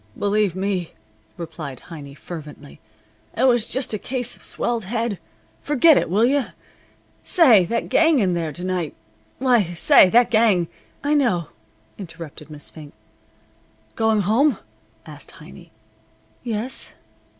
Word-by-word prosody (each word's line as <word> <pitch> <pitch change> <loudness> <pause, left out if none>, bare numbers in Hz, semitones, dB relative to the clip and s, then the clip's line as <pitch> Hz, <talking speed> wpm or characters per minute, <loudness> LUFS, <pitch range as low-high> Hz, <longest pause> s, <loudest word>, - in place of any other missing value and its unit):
"Believe 205 -3 +1
me!" 190 -3 -2 0.4
replied 160 -5 -7
Heiny, 145 -4 -9
fervently. 150 -4 -10 0.6
"It 240 - +1
was 240 -4 +3
just 260 -3 -1
a 215 - -2
case 250 0 -3
of - - -16
swelled 235 -4 -2
head. 225 -1 -2 0.4
Forget 295 +2 +5
it, - - +1
will 205 +6 +3
you? 275 +1 +2 0.8
Say, 245 - +5
that 230 +6 -2
gang 325 -2 +4
in 190 -7 +2
there 165 -2 -2
to 175 +5 -9
night 180 -4 -2 0.4
why, 250 -3 +3
say, 185 - +6
that 240 +3 +4
gang 215 -7 +3 0.2
" - - -35
"I 290 +1 +1
know," 225 - +1 0.5
interrupted 165 -4 -10
Miss 150 -1 -8
Fink. 150 -3 -12 1.0
"Going 220 -2 +2
home?" 230 +6 +2 0.5
asked 150 -2 -7
Heiny. 170 +2 -14 0.7
"Yes." 230 +2 -3
205 Hz, 135 wpm, -22 LUFS, 170-240 Hz, 1.0 s, say